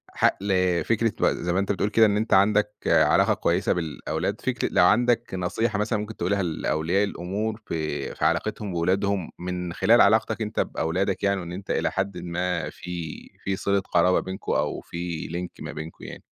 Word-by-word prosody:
ح - - +2 0.2
ل 95 -3 +1
فكرة 115 -1 +1
ب - - +3
زَي 85 0 -2
ما 95 - +2
أنت 100 +1 0
بتقول 100 +1 0
كده 110 +1 +5
إن 105 -1 +2
أنت 110 +2 0
عندك 105 +2 +4
علاقة - - +4
كويسة - - +1
بالأولاد، 80 +3 -3
فكرة 125 -3 -1
لو 90 - +5
عندك 120 +2 +2
نصيحة 100 +4 -1
مثلًا 105 0 0
ممكن 105 +1 -6
تقولها 95 +3 0
لأولياء 80 +2 0
الأمور 105 +3 -3
في 75 -4 -3
في - - -1
علاقتهم 105 -2 0
بولادهم 95 +2 0
من 90 -1 -4
خلال 115 +7 +5
علاقتك 110 +2 +3
أنت 105 -1 -3
بأولادك 90 +5 -1
يعني، 100 -1 +1
وإن 85 -1 -7
أنت 95 +3 -6
إلى - - 0
حدٍ 95 -1 -2
ما 90 +1 -2
في، 85 -3 -6 0.3
في 95 - -1
صِلة 100 0 +1
قرابة 90 -1 +2
بينكم 95 +1 -5
أو - - 0
فيه 85 -1 -5
link 90 +2 -3
ما - - -6
بينكم 80 +2 -8
يعني. - - -9
95 Hz, 185 wpm, -25 LUFS, 85-105 Hz, 0.3 s, كده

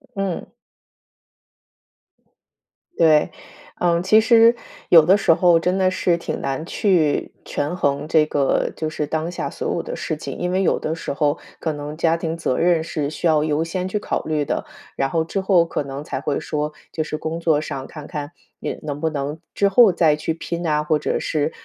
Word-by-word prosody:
嗯。 195 -3 -3 2.4
对， 155 0 +4 0.5
嗯， 170 -1 +2
其 215 +4 +5
实 230 +1 +6 0.3
有 165 -2 +8
的 190 +6 +5
时 195 - +4
候 170 0 +4
真 180 +3 0
的 185 - +3
是 185 -1 +1
挺 170 - -4
难 135 +3 -2
去 170 -4 +1
权 145 +4 -3
衡 145 -3 0
这 155 -1 +4
个 140 -2 +1
就 155 - -3
是 150 -1 -3
当 160 +3 -2
下 - - -4
所 - - -3
有 - - -1
的 - - -6
事 - - -3
情。 - - -7
因 180 0 -2
为 185 +1 +1
有 - - +2
的 155 - -2
时 165 - -5
候 145 +1 0 0.2
可 160 -2 -2
能 145 +1 -7
家 165 0 +2
庭 165 0 -3
责 145 -6 -1
任 170 -2 +3
是 150 -3 -3
需 155 - -6
要 155 -2 +4
优 155 0 0
先 180 +2 -3
去 200 - -2
考 205 - -2
虑 155 -2 0
的， - - -2 0.3
然 135 - 0
后 160 +2 +1
之 195 +4 -3
后 185 -3 +4
可 165 - -3
能 140 +1 -6
才 - - -4
会 145 - -1
说， 150 -1 -3 0.2
就 155 - -2
是 155 0 -4
工 160 +2 -4
作 160 -3 +2
上 135 -3 -5
看 150 -2 -10
看 150 -2 -6 0.3
也 - - -4
能 145 -1 -5
不 160 - +1
能 145 +1 -4 0.2
之 200 - +3
后 215 +1 +6
再 160 -3 +3
去 155 +2 -2
拼 170 +1 -5
啊， 150 -1 +1
或 150 0 +1
者 - - -1
是， 155 0 -1
160 Hz, 215 characters per minute, -21 LUFS, 150-175 Hz, 2.4 s, 有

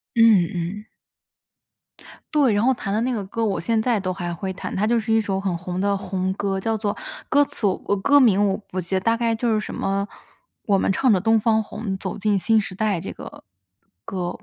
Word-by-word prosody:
嗯， 220 -7 +5 0.3
嗯。 210 - -18 1.5
对， 280 -6 +4
然 205 0 +2
后 260 +2 +3
弹 195 -4 -4
的 215 - +1
那 250 +2 0
个 215 -5 -2
歌， 225 +4 -2
我 205 -3 0
现 225 +5 0
在 230 0 +1
都 185 -2 -2
还 175 -2 -4
会 190 +3 -4
弹， 185 - -6
它 205 +3 +1
就 235 +1 +2
是 220 0 -2
一 225 - +4
首 195 -3 -2
很 190 -3 -1
红 180 +1 -4
的 200 0 +1
红 190 -1 -2
歌， 195 -1 -2
叫 225 +3 -1
做 210 -1 -2 0.4
歌 290 - +5
词 280 -6 -3 0.2
呃， 200 - +1
歌 285 +9 +4
名 205 -6 +4
我 190 - 0
不 185 - -3
记 180 +2 -4
得， - - +1
大 230 +4 +2
概 230 -1 0
就 235 +2 -1
是 220 -1 +2
什 - - -6
么， 195 +1 -1 0.6
《我 200 - +3
们 195 - +1
唱 255 +6 +2
着 195 -4 +4
东 225 +3 +3
方 220 0 +2
红 210 -2 -5
走 190 -1 -5
进 205 -1 +1
新 220 +3 +3
时 195 -2 -6
代》 205 -1 0
这 - - -5
个 - - -11 0.6
歌。 180 +1 -3
205 Hz, 245 characters per minute, -23 LUFS, 190-225 Hz, 1.5 s, 嗯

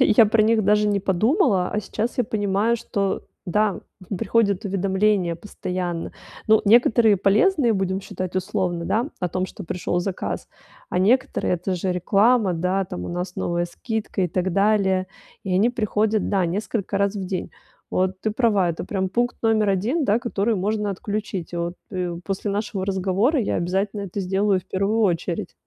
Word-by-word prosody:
я 230 -3 +6
про 215 +1 +3
них 220 -1 +3
даже 210 +1 +3
не 200 -1 +1
подумала, 200 - +2
а 210 - -1
сейчас 220 +5 -3
я 245 - +3
понимаю, 210 +2 +1
что, 200 -4 -2 0.2
да, 210 +3 +1 0.3
м, 200 - -1
приходят 205 -4 +1
уведомления 195 -2 +1
постоянно. 180 -2 -4 0.3
Ну, 220 0 +5
некоторые 225 -1 +5
полезные, 230 - +3
будем 190 -1 -1
считать, 185 -2 -5
условно, 185 -3 -1
да, 235 - 0
о 180 - -1
том, 185 +2 -2
что 200 - -9
пришел 175 +1 -2
заказ, 185 0 -4 0.4
а - - 0
некоторые- 215 0 +2
это 180 +2 -2
же 180 +1 -2
реклама, 200 +3 +3
да, 180 +3 0
там 90 - -6
у - - -5
нас 180 +1 -4
новая 175 0 -1
скидка 215 +3 -3
и 180 - +1
так 185 +2 -1
далее. 195 -2 +2 0.4
И 190 -2 -1
они 215 +6 +3
приходят, 215 -2 0
да, 195 -3 +2
несколько 200 +2 -2
раз 200 +1 +1
в 195 -2 -4
день. 185 0 -4 0.4
Вот 185 0 0
ты 215 - -1
права, 210 -6 +2
это 165 - -5
прям 190 -2 -2
пункт 240 +5 0
номер 220 -2 +3
1, 235 - 0
да, 215 -1 +3
который 230 -2 0
можно 210 +1 -1
отключить. 200 -3 -4
Вот. 170 +1 -2 0.2
И 180 -2 -2
после 195 +1 -3
нашего 200 -1 -2
разговора 195 - +1
я 210 - -1
обязательно 195 +4 -1
это 200 +1 -4
сделаю 195 +1 +1
в - - -26
первую 200 +4 0
очередь. 175 -4 0
200 Hz, 175 wpm, -23 LUFS, 185-215 Hz, 0.4 s, я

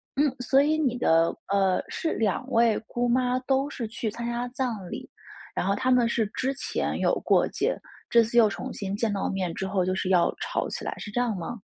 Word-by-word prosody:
嗯， 285 -1 +2
所 265 +2 +4
以 310 +2 +2
你 255 -5 +1
的 165 -7 +3
呃， 195 -2 +2
是 320 - -2
两 225 +4 -1
位 230 -1 +4
姑 245 0 -1
妈 250 +1 +2
都 270 +2 +1
是 235 -6 -4
去 225 0 -3
参 235 +1 -6
加 240 +1 -2
葬 235 -8 -3
礼， - - -7 0.5
然 - - -1
后 200 - +2
她 255 - +1
们 245 -2 +4
是 225 -2 +1
之 260 +5 -2
前 - - -2
有 - - +2
过 - - +3
节， - - -1 0.3
这 235 -1 +6
次 235 +2 -2
又 220 -3 +7
重 - - -5
新 200 -1 -4
见 220 0 0
到 195 - -1
面 185 -3 -2
之 190 - -3
后 190 -2 0
就 185 - 0
是 190 - -2
要 180 -2 +3
吵 - - -1
起 - - -5
来， - - -2
是 205 - -7
这 245 - -1
样 230 -4 0
吗？ 190 +7 -5
235 Hz, 245 characters per minute, -26 LUFS, 200-250 Hz, 0.5 s, 又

